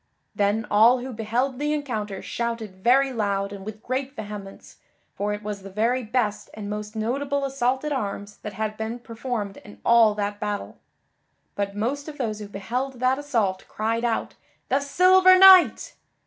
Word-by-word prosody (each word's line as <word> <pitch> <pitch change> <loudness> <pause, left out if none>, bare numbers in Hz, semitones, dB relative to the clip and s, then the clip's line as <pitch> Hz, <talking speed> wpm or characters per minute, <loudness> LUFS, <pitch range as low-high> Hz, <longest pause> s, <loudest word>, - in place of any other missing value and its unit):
Then 205 +2 +1
all 225 +5 +6
who 260 0 -6
beheld 240 +4 -1
the 295 +1 0
encounter 220 -9 -4
shouted 225 -5 -4
very 265 +2 +4
loud 200 -3 -1
and 195 -1 -8
with 215 +1 -8
great 265 +2 -3
vehemence, 205 -2 -9 0.4
for 205 +1 -2
it 210 0 -4
was 205 -1 -5
the 195 - -9
very 230 +6 0
best 220 -2 -2
and 210 -1 -6
most 210 +1 -5
notable 275 +6 -1
assault 265 0 -1
at 300 - -2
arms 205 -5 -4
that 210 - -8
had 215 +1 -3
been 220 +2 -4
performed 230 -4 -5
in 205 - -14
all 230 -3 +5
that 205 0 -3
battle. 210 -1 -4 0.7
But 200 0 -3
most 265 +8 -2
of 300 -1 -8
those 215 -5 -3
who 210 - -7
beheld 235 +7 -3
that 255 +2 +2
assault 225 -10 -1
cried 225 +2 -2
out 235 -2 -1 0.4
"The 270 - +3
Silver 370 +6 +5
Knight!" 380 -1 +7
225 Hz, 170 wpm, -24 LUFS, 205-260 Hz, 0.7 s, Knight